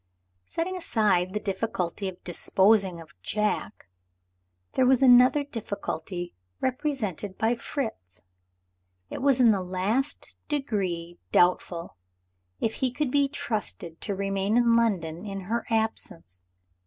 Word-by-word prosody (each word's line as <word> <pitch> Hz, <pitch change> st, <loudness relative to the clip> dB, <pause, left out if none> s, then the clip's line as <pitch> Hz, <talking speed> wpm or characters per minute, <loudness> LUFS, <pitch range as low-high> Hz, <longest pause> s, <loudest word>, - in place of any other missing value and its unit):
Setting 365 Hz, +3 st, -2 dB
aside 210 Hz, -, +1 dB
the 210 Hz, -, -2 dB
difficulty 195 Hz, -2 st, -2 dB
of 180 Hz, -, -13 dB
disposing 190 Hz, +1 st, +3 dB
of 160 Hz, -2 st, -13 dB
Jack, 210 Hz, -, -2 dB, 0.9 s
there 255 Hz, -, +3 dB
was 265 Hz, 0 st, +4 dB
another 255 Hz, +3 st, +7 dB
difficulty, 185 Hz, -, -5 dB, 0.3 s
represented 245 Hz, -, -2 dB
by 225 Hz, +2 st, +2 dB
Fritz. 225 Hz, -, -5 dB, 0.9 s
It -, -, -5 dB
was 270 Hz, -1 st, +4 dB
in 240 Hz, -3 st, +7 dB
the 200 Hz, -3 st, +1 dB
last 190 Hz, +10 st, -1 dB
degree 190 Hz, -, -2 dB
doubtful 175 Hz, -, +2 dB, 0.6 s
if 225 Hz, -, -1 dB
he 260 Hz, -, +1 dB
could 270 Hz, +1 st, -1 dB
be 285 Hz, 0 st, +3 dB
trusted 210 Hz, -, -4 dB
to 200 Hz, -, -2 dB
remain 195 Hz, +2 st, 0 dB
in 235 Hz, -1 st, +4 dB
London 180 Hz, -7 st, 0 dB
in 195 Hz, -2 st, -5 dB
her 230 Hz, +5 st, -2 dB
absence. 220 Hz, -, -2 dB
210 Hz, 120 wpm, -27 LUFS, 180-245 Hz, 0.9 s, another